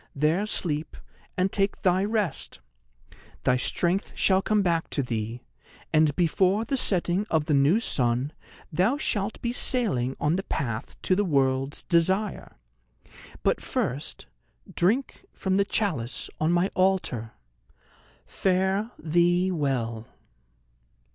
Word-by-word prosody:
There 160 +8 +1
sleep, 155 -6 -1 0.4
and 185 +1 +1
take 195 0 -1
thy 185 +1 +3
rest! 210 -3 -2 0.9
Thy 125 - +3
strength 175 +8 -1
shall 190 -1 +3
come 210 0 +2
back 170 -2 0
to 140 - 0
thee, 115 0 -4 0.5
and 155 -2 +4
before 185 +5 +2
the 275 - -1
setting 190 -3 0
of 155 -2 +1
the 150 - 0
new 145 +9 +4
sun 125 - 0 0.4
thou 195 - +2
shalt 210 -7 -2
be 235 0 -1
sailing 175 - 0
on 155 +4 +1
the - - -1
path 115 - -4
to 185 - +3
The 205 - +2
World's 135 -4 +1
Desire. 190 +4 0 0.9
But - - +1
first 135 +4 -3 0.5
drink 225 +10 0
from 190 0 0
the 200 - +3
chalice 155 - -2
on 155 +2 +2
my 175 +2 +2
altar. 185 - 0 0.9
Fare 190 +3 0
thee 175 +3 +2
well!" 120 -8 -2
175 Hz, 125 wpm, -26 LUFS, 140-195 Hz, 0.9 s, and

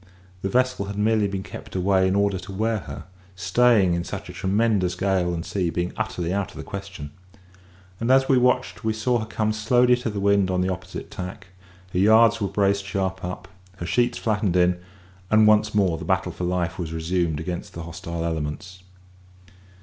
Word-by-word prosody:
The 95 - -2
vessel 125 -2 +1
had 100 0 -6
merely 105 0 +2
been 95 -1 -4
kept - - -10
away 95 0 +3
in 95 - +1
order 100 -2 +1
to 95 +2 -9
wear 110 +3 0
her; - - -8 0.3
staying 95 +1 +3
in 85 0 -1
such - - -6
a - - -7
tremendous 100 -2 +1
gale 95 -1 +1
and 85 -1 -4
sea 90 -4 -1
being 85 +1 -2
utterly 90 -5 -2
out 100 -1 -1
of - - -13
the - - -6
question. 95 -7 -7 0.9
And 115 - -1
as 135 0 +5
we 135 - +4
watched 125 -7 +1
we 110 0 +1
saw 120 +3 +1
her 110 - -5
come 110 -1 -1
slowly 120 +3 +3
to 125 -1 -3
the 105 -2 -4
wind 100 -1 +3
on 90 0 +1
the 90 - 0
opposite 90 0 -8
tack; 90 0 -7 0.4
her 90 - +1
yards 110 +3 +5
were 100 - +1
braced 100 +1 +1
sharp 95 -1 -3
up, 90 0 -5 0.3
her 85 - -5
sheets 120 +6 +1
flattened 105 -4 0
in, 90 0 +3 0.5
and 110 0 +5
once 105 0 +4
more 95 -6 +2
the - - -6
battle - - 0
for 90 - -4
life 90 0 -1
was 80 -3 -4
resumed 80 -1 -1
against 85 +2 -5
the 85 - -5
hostile 85 0 -5
elements. 80 +3 -4
95 Hz, 195 wpm, -24 LUFS, 90-110 Hz, 0.9 s, as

